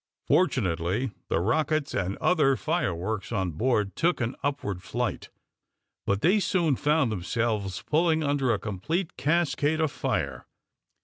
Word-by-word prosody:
Fortunately 105 - +1 0.2
the - - +1
rockets 150 - 0
and 95 0 -1
other 150 -7 +3
fireworks 110 - -2
on 95 -5 -1
board 105 - 0
took 175 +2 +1
an 120 +1 -2
upward 115 -10 -2
flight, - - -3 0.8
but 100 +1 +1
they 195 +5 +4
soon 175 -6 +1
found 150 -3 +2
themselves 105 -1 -2
pulling 160 0 +2
under 140 -3 +1
a 110 - +2
complete 155 - -3
cascade 155 -1 +1
of 160 -3 +1
fire. - - -2
130 Hz, 130 wpm, -27 LUFS, 100-155 Hz, 0.8 s, they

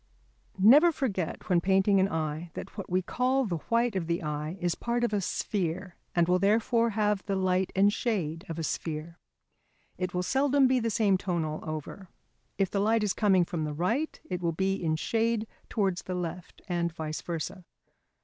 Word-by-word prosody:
Never 275 - +7
forget 200 - -3
when 175 -2 +3
painting 195 +2 +3
an 190 +1 +3
eye 160 0 -3
that - - -7
what 195 - -6
we 185 +1 +1
call 255 +6 +1
the 175 -6 -2
white 235 -1 +2
of 175 -4 -1
the 170 0 -1
eye 150 +3 -3
is 175 -1 0
part 240 +4 -2
of 235 - +1
a 205 - +1
sphere 185 -1 -2 0.2
and 170 -1 +3
will 180 +1 +3
therefore 230 +4 +3
have 210 -2 +1
the 200 - 0
light 185 0 +1
and 200 +2 +4
shade 170 -10 -2
of 165 - -4
a 165 - -3
sphere. 160 +2 -4 0.8
It 185 -1 -2
will 180 - 0
seldom 275 +5 +3
be 255 0 +3
the 230 -1 0
same 205 -4 +2
tone 175 -4 -1
all 155 0 -4
over; 155 +4 -6 0.5
if 195 -2 +1
the 200 - 0
light 220 +1 +2
is 205 - +1
coming 190 -5 +3
from 170 -3 -3
the 150 -1 -3
right, 225 - -1
it 180 -1 -3
will 170 -1 0
be 190 +3 0
in 165 -4 -1
shade 225 +5 0 0.2
towards 195 -5 0
the 185 - -5
left 175 0 -6
and 170 -2 0
vice 155 -1 -5
versa. 170 +2 -5
185 Hz, 195 wpm, -29 LUFS, 170-215 Hz, 0.8 s, Never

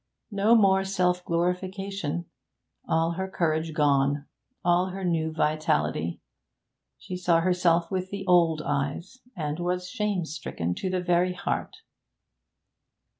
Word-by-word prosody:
No 205 +3 +4
more 195 -3 +4
self 180 -2 +1
glorification! 180 0 -2 0.6
All 165 +1 +2
her 190 +3 -3
courage 160 -3 0
gone, 140 -1 +2 0.4
all 175 +1 +3
her 190 0 -5
new 160 -2 0
vitality! 150 - 0 0.8
She 185 - -7
saw 175 -2 +2
herself 175 -1 +2
with 185 -1 -2
the 200 -1 -5
old 170 -4 +4
eyes, 145 - -2 0.2
and 150 -1 -3
was 180 +1 -1
shame 210 -4 -1
stricken 90 - -4
to 185 - -3
the 185 -1 -1
very 180 0 +2
heart. 180 - -4
175 Hz, 125 wpm, -27 LUFS, 160-185 Hz, 0.8 s, No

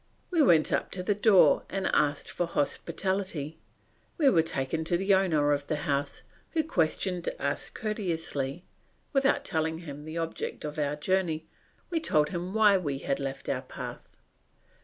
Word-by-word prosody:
We 335 -3 +3
went 170 - +5
up - - 0
to 180 - -3
the 205 - +2
door 205 -2 +5
and 195 0 -2
asked 145 -1 +1
for 175 - -1
hospitality. 170 0 -2 0.6
We 290 -6 +5
were 165 - +5
taken 160 0 -2
to 170 +1 +2
the 195 +2 +2
owner 160 -7 +3
of 145 -1 0
the 155 - 0
house, 140 -2 -1 0.3
who 320 -1 +2
questioned 180 - 0
us 140 0 -2
courteously; 170 -7 -3 0.5
without 275 0 +2
telling 160 0 -1
him 150 -3 -8
the 155 +1 -6
object 165 -2 -4
of 150 +1 -5
our 145 0 0
journey, 160 0 0 0.5
we 335 - +1
told 150 - +2
him 175 +1 -4
why 210 -3 +6
we 145 -6 -2
had 135 0 -2
left 135 -1 -5
our - - -1
path. - - -8
165 Hz, 160 wpm, -29 LUFS, 150-195 Hz, 0.6 s, why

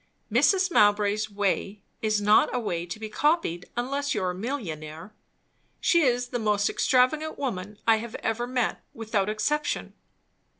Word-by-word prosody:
"Mrs. 365 - +3
Mowbray's 210 -3 +3
way 200 0 -2 0.2
is 215 -1 +1
not 210 +1 +4
a - - +1
way 175 -6 -3
to 175 +5 -6
be 220 - -5
copied, 255 - 0
unless 280 +4 -1
you - - -1
are 180 - 0
a - - -6
millionaire. 180 - -6 0.7
She 340 - +3
is 245 -3 +1
the 245 - -2
most 210 -2 +1
extravagant 300 +5 +2
woman 210 -6 -4
I 225 -1 +5
ever 230 +1 -3
met, 250 -2 -1
without 215 -3 -1
exception." 295 +8 -1
220 Hz, 145 wpm, -26 LUFS, 205-255 Hz, 0.7 s, I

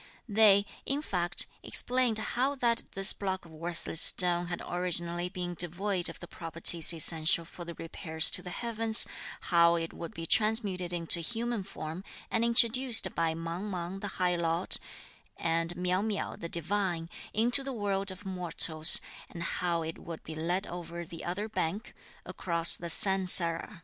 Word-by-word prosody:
They, 205 -2 +4 0.2
in 285 +2 -3
fact, 175 - -2 0.2
explained 250 -3 +2
how 255 +5 -1
that 235 -3 +1
this 195 +1 +4
block 190 -2 -4
of 165 - -16
worthless 165 0 -2
stone 175 -1 +3
had 175 0 -5
originally 175 0 -2
been 180 -1 -5
devoid 180 +2 -1
of 165 - -10
the 175 - -10
properties 165 0 +3
essential 165 0 0
for 175 +1 -11
the 170 0 -8
repairs 160 -1 +3
to - - +2
the 180 - -8
heavens, 225 +2 +1 0.4
how 170 -1 +3
it 165 -1 -4
would 170 - -9
be 165 - -6
transmuted 205 -3 +1
into 170 0 +4
human 230 +5 -3
form 175 -2 -8 0.3
and 225 - +1
introduced 235 +1 +3
by 165 -1 -1
Mang 165 +5 -6
Mang 180 0 -5
the 205 - -5
High 180 -1 0
Lord, 170 +1 0 0.6
and 165 +1 -2
Miao 180 +1 -1
Miao, 210 -1 -3
the 170 - -8
Divine, 170 0 -3 0.2
into 240 +5 0
the 270 - -5
world 200 -4 -3
of 190 +2 -10
mortals, 170 -3 +4 0.3
and 170 - -7
how 170 -1 -2
it 160 0 -7
would 165 -1 -9
be 160 - -8
led 175 +5 -2
over 170 0 -8
the 165 0 -10
other 195 +5 -4
bank 205 0 -4 0.3
(across 170 -2 +2
the 170 - -7
San 190 +2 +5
Sara). 170 +2 +2
180 Hz, 165 wpm, -29 LUFS, 170-205 Hz, 0.6 s, San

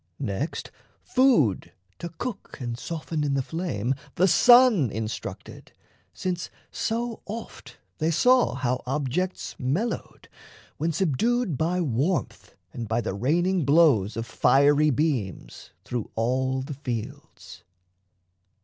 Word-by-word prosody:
Next, 130 - -4 0.3
food 245 - +2 0.3
to 170 - -5
cook 215 +7 -7
and 120 -2 -4
soften 160 +3 -4
in 140 -1 0
the 135 - 0
flame 135 - -2 0.2
The 185 - +4
sun 240 - +6
instructed, 110 +1 -6 0.4
since 180 -1 -4 0.2
so 230 +1 -2
oft 225 +2 -8 0.2
they 160 +1 +1
saw 250 +10 +3
How 125 -1 -1
objects 150 +7 -2
mellowed, 155 - -3 0.5
when 160 +3 0
subdued 190 - 0
by 170 +6 0
warmth 150 +5 -2 0.2
And 115 -2 -5
by 115 +3 0
the 95 - -3
raining 170 - +1
blows 140 - +4
of 115 - -3
fiery 145 +5 +4
beams, 130 - -2 0.2
Through 120 -3 -4
all 130 +3 0
the 140 - -6
fields. 125 -6 -7
150 Hz, 115 wpm, -25 LUFS, 125-180 Hz, 0.5 s, sun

